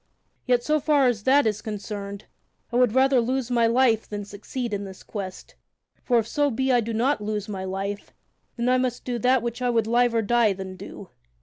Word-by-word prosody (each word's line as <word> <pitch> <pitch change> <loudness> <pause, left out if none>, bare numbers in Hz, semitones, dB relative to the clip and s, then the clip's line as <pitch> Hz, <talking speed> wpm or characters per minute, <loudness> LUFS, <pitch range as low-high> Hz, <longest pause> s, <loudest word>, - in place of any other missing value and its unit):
Yet, 245 -1 +3
so 305 +2 +2
far 290 -1 +3
as 230 -5 0
that 280 +1 +5
is 210 -1 0
concerned, 205 -1 -6 0.5
I - - -4
would 245 -2 +3
rather 265 -1 +4
lose 255 +1 -2
my 235 -1 +3
life 230 -2 +2
than 205 -1 -5
succeed 215 +4 -5
in 200 0 -2
this 190 -1 -10
quest, 190 -3 -7 0.5
for 245 - +2
if 225 -1 +1
so 290 +4 +1
be 265 +1 0
I 245 -1 +4
do 230 +1 -4
not 235 +3 +1
lose 210 -1 -3
my 190 -3 -5
life, 195 +2 -4 0.5
then 235 +1 -1
I 255 0 +3
must 255 -1 -2
do 245 -1 -2
that 250 +1 +3
which 235 +1 -4
I 250 - +1
would 230 -2 +2
liever 235 0 +2
die 230 -1 +3
than 190 0 -7
do. - - -10
230 Hz, 210 wpm, -25 LUFS, 205-250 Hz, 0.5 s, that